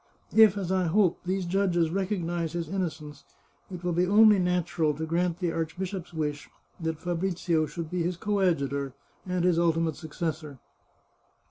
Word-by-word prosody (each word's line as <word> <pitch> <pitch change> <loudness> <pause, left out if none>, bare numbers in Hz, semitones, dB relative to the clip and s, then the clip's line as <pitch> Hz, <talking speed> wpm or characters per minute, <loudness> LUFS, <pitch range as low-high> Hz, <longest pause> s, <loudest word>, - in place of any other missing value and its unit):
If, 220 -3 +7
as 190 -2 -3
I 185 -1 +2
hope, 185 0 +2
these 185 0 -1
judges 175 -3 +1
recognise 175 -4 -2
his 170 -2 -3
innocence, 155 -5 -4 0.5
it 180 -2 -8
will 175 -1 0
be 175 +2 +2
only 210 +1 +6
natural 175 -4 0
to 160 +3 -3
grant 170 +1 0
the 175 -2 -1
archbishop's 175 +3 -4
wish 150 -3 -3 0.3
that 160 -2 -2
Fabrizio 175 -2 0
shall 170 - -5
be 175 +2 -3
his 175 +1 -1
coadjutor, 150 - 0 0.3
and 180 -1 -1
his 175 -2 +3
ultimate 165 -2 +1
successor. 155 -2 -5
175 Hz, 150 wpm, -27 LUFS, 160-185 Hz, 0.5 s, If